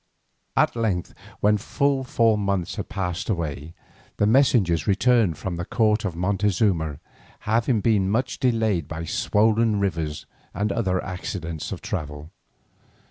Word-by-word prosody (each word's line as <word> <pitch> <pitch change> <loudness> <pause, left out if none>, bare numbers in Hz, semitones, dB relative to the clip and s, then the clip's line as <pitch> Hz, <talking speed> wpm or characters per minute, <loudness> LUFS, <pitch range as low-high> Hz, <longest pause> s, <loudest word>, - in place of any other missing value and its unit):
At - - +3
length, 105 -7 -1 0.3
when 105 +1 +4
full 140 +4 0
four 115 -3 +2
months 100 -3 -1
had - - -5
passed 90 -1 -3
away, 80 -4 -3 0.4
the - - +2
messengers 110 - +3
returned 105 -4 +3
from 90 -3 -4
the 85 - -3
court 105 +3 +1
of 90 -5 -3
Montezuma, 90 -4 +1 0.4
having 115 +1 +1
been 100 -4 +2
much 120 +5 -1
delayed 110 - +1
by 80 +1 -5
swollen 110 +4 +2
rivers 80 -6 -2 0.3
and 105 0 0
other 95 -4 0
accidents 85 -3 -5
of - - -5
travel. 75 +1 -5
100 Hz, 135 wpm, -24 LUFS, 85-110 Hz, 0.4 s, when